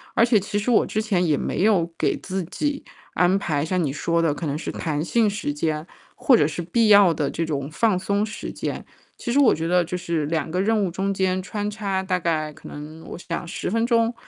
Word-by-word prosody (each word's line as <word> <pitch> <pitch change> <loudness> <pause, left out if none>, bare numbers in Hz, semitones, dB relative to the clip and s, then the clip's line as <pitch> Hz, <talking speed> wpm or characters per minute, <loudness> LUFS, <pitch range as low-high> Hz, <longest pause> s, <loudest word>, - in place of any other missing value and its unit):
而 230 - +5
且 230 -2 +4
其 205 +1 -1
实 210 - -2
我 230 - +4
之 215 - -1
前 195 -5 +1
也 150 -4 +2
没 185 - -1
有 185 -6 +3
给 - - +1
自 190 -1 -4
己 285 - -3 0.3
安 180 +2 +3
排， 150 -6 -1
像 180 +2 0
你 140 -4 -1
说 170 +2 0
的 160 -3 +2
可 160 - -5
能 145 0 -2
是 - - -5
弹 150 -3 -2
性 220 +3 +2
时 200 -8 -3
间 155 +1 -2 0.3
或 260 - +4
者 - - +3
是 165 +2 -4
必 215 +7 +1
要 200 -5 +7
的 145 -2 -1
这 165 - -2
种 140 -2 -3
放 210 +2 +2
松 200 +2 0
时 215 - -6
间。 - - -5 0.3
其 240 - -4
实 285 - +4
我 275 -5 +6
觉 165 +1 -3
得 180 0 +3
就 180 +2 -4
是 170 -4 -2
2 160 0 -1
个 180 +3 0
任 215 0 +2
务 - - -1
中 195 +2 -1
间 185 -1 0
穿 205 +1 -3
插 200 -3 -2
大 185 -1 0
概 155 -3 -1
可 - - -13
能 155 +2 -9
我 - - -7
想 175 -1 -5
10 - - -4
分 230 +3 +1
钟 230 -1 +2
180 Hz, 250 characters per minute, -23 LUFS, 160-210 Hz, 0.3 s, 要